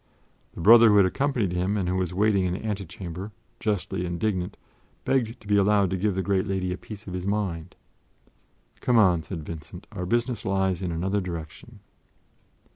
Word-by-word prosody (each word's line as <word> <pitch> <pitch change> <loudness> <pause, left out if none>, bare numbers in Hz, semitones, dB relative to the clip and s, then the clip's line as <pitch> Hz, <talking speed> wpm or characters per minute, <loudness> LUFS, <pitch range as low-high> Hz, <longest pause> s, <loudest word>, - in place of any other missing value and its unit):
The - - -6
brother 115 +5 +8
who 105 - +5
had 100 - +7
accompanied 120 -1 0
him 90 +4 0
and 95 -3 -1
who 90 - 0
was 95 -1 -1
waiting 100 0 +2
in 90 - 0
the 100 - -7
antechamber, 95 -1 -5 0.3
justly 95 -3 -1
indignant, 90 +1 -2 0.5
begged 125 -2 0
to - - -18
be 100 0 +2
allowed 100 -1 +3
to - - 0
give 100 +1 0
the 95 - -1
great 100 0 0
lady 95 -2 -1
a - - -6
piece 105 -1 -10
of 95 - -7
his 90 +1 -4
mind. 95 -5 -2 1.0
"Come 125 - +2
on," 90 -6 +5
said 80 -2 -7
Vincent; 80 +3 -8
"our 90 -4 -5
business 120 +1 0
lies 95 -2 0
in 90 -2 -2
another 95 +5 -1
direction." 90 +5 -8
95 Hz, 185 wpm, -26 LUFS, 90-105 Hz, 1.0 s, brother